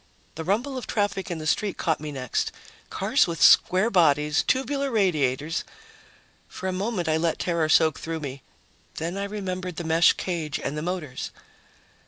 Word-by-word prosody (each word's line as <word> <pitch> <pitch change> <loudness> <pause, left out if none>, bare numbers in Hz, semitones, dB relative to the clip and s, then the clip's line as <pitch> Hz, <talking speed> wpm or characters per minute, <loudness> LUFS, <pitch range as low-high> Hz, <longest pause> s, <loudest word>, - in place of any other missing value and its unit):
The 160 - -6
rumble 240 - -1
of - - -9
traffic 205 -3 -1
in 175 - -3
the 155 - -6
street 200 +6 0
caught 160 -2 0
me 150 0 -6
next. 130 -4 -2 0.4
Cars - - +2
with 165 -2 -4
square 190 +6 +5
bodies, 150 -4 +3
tubular 275 +1 0
radiators.... 160 - 0 0.8
For 190 - -6
a - - 0
moment, 190 -2 -2
I 160 0 +2
let 165 0 0
terror 170 -3 0
soak 160 -1 +4
through 165 -1 -4
me. 140 -2 -6 0.5
Then 165 +3 -3
I 200 0 -2
remembered 185 -3 -4
the 170 - -4
mesh 165 +1 +4
cage 165 -5 -3
and 140 - -4
the 150 - -3
motors. 160 -6 -4
170 Hz, 170 wpm, -25 LUFS, 155-195 Hz, 0.8 s, square